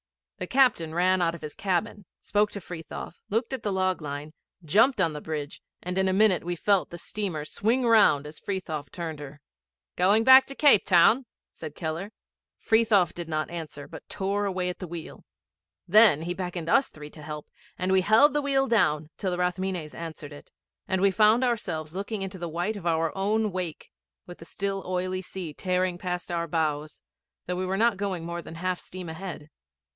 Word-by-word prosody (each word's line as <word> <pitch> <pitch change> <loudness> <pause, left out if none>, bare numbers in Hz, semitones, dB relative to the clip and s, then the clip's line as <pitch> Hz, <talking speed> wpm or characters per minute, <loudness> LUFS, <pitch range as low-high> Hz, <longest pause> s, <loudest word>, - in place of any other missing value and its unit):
The 180 - -4
captain 240 -12 +2
ran 185 +1 +3
out 170 -1 +1
of 170 - -12
his 150 - -6
cabin, 200 +2 -2
spoke 210 +1 +1
to 200 - -5
Frithiof, 175 -1 -8
looked 225 +5 -1
at 260 - -3
the 205 - -2
log 185 -2 0
line, 145 +1 -6 0.3
jumped 225 - +4
on 165 -4 +2
the 150 - -6
bridge, 150 -2 -5 0.2
and 180 +1 -4
in 190 - +2
a 190 - +1
minute 195 -2 +3
we 175 +1 -3
felt 195 +2 +1
the 175 - -8
steamer 175 -5 -4
swing 235 +9 0
round 210 -11 +5
as 150 +1 -9
Frithiof 160 -8 -4
turned 165 -4 -5
her. 145 0 -9 0.6
''Going 200 +5 +4
back 260 0 +9
to 275 - -7
Cape 285 -9 +5
Town?' 215 +8 +4 0.2
said 155 -2 -9
Keller. 165 +5 -4 0.5
Frithiof 215 -6 +3
did 170 -2 -7
not 155 0 -2
answer, 155 -4 -7
but - - -12
tore 200 +1 -1
away 185 -2 -1
at 180 - -6
the 185 - -6
wheel. 170 -1 -8 0.6
Then 205 -5 +6
he 175 +1 -2
beckoned 180 -2 -5
us 275 +5 +4
three 150 -1 -11
to 155 - -11
help, 150 0 -7 0.3
and 185 +1 -1
we 190 0 +4
held 225 +9 +5
the 295 - +1
wheel 275 -1 +2
down 155 - +1
till 190 - -2
the 180 - -2
Rathmines 180 -3 -2
answered 155 -3 -8
it, 145 - -14 0.4
and 190 - 0
we 200 - +5
found 215 +5 +4
ourselves 175 -10 -2
looking 200 +1 -3
into 190 -1 -6
the 170 -1 -4
white 175 +7 -2
of 185 -4 -5
our 165 -1 0
own 210 +2 0
wake, 180 -3 -5 0.3
with 175 - -11
the 165 - -11
still 195 +2 -3
oily 185 0 -2
sea 180 -4 -7
tearing 180 +1 -1
past 180 -1 -4
our 170 -1 -1
bows, 155 -2 -2 0.4
though 180 - -2
we 185 +1 -2
were 190 +1 -1
not 230 -1 +3
going 190 -4 -3
more 170 0 -4
than 160 - -10
half 180 +1 -2
steam 185 -1 -8
ahead. 160 -2 -7
180 Hz, 200 wpm, -27 LUFS, 165-205 Hz, 0.6 s, back